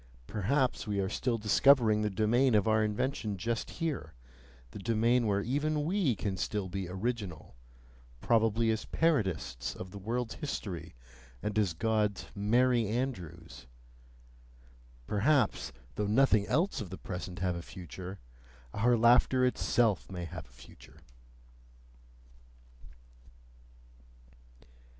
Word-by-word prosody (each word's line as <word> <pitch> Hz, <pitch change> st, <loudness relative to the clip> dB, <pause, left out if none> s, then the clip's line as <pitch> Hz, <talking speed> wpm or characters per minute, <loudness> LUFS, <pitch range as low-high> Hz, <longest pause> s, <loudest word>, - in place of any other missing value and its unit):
Perhaps 120 Hz, -, 0 dB
we 100 Hz, -1 st, -1 dB
are 95 Hz, -1 st, 0 dB
still 120 Hz, +2 st, -1 dB
discovering 110 Hz, 0 st, +4 dB
the 105 Hz, -, +1 dB
domain 110 Hz, +5 st, +2 dB
of 105 Hz, 0 st, +3 dB
our 110 Hz, 0 st, +3 dB
invention 105 Hz, -1 st, -2 dB
just 115 Hz, +4 st, -2 dB
here, 150 Hz, -, -4 dB, 0.6 s
the -, -, -8 dB
domain 115 Hz, +3 st, +2 dB
where 100 Hz, -1 st, +1 dB
even 145 Hz, +4 st, 0 dB
we 170 Hz, -, +1 dB
can 95 Hz, -2 st, -3 dB
still 100 Hz, +2 st, -2 dB
be 95 Hz, -1 st, -4 dB
original, 95 Hz, -, -4 dB, 0.7 s
probably 115 Hz, -, +2 dB
as 110 Hz, -, -2 dB
parodists 95 Hz, -, 0 dB
of 95 Hz, -, -8 dB
the 100 Hz, -, -8 dB
world's 115 Hz, +3 st, -2 dB
history 85 Hz, -, -5 dB, 0.5 s
and 105 Hz, +1 st, 0 dB
as 100 Hz, -5 st, +1 dB
God's 105 Hz, 0 st, 0 dB
Merry 120 Hz, +3 st, +2 dB
Andrews, 85 Hz, -, -4 dB, 1.4 s
perhaps, 120 Hz, -, +1 dB, 0.2 s
though 105 Hz, -, -2 dB
nothing 110 Hz, -2 st, +3 dB
else 155 Hz, -, +1 dB
of 100 Hz, -, -6 dB
the 95 Hz, -, -7 dB
present 90 Hz, 0 st, -6 dB
have 90 Hz, -1 st, -1 dB
a 85 Hz, -, -5 dB
future, 90 Hz, +2 st, -8 dB, 0.6 s
our 120 Hz, +3 st, +3 dB
laughter 125 Hz, +2 st, +5 dB
itself 120 Hz, -4 st, +1 dB
may 90 Hz, -2 st, -5 dB
have 85 Hz, -2 st, -8 dB
a -, -, -24 dB
future! 60 Hz, +1 st, -16 dB
105 Hz, 120 wpm, -31 LUFS, 95-125 Hz, 1.4 s, laughter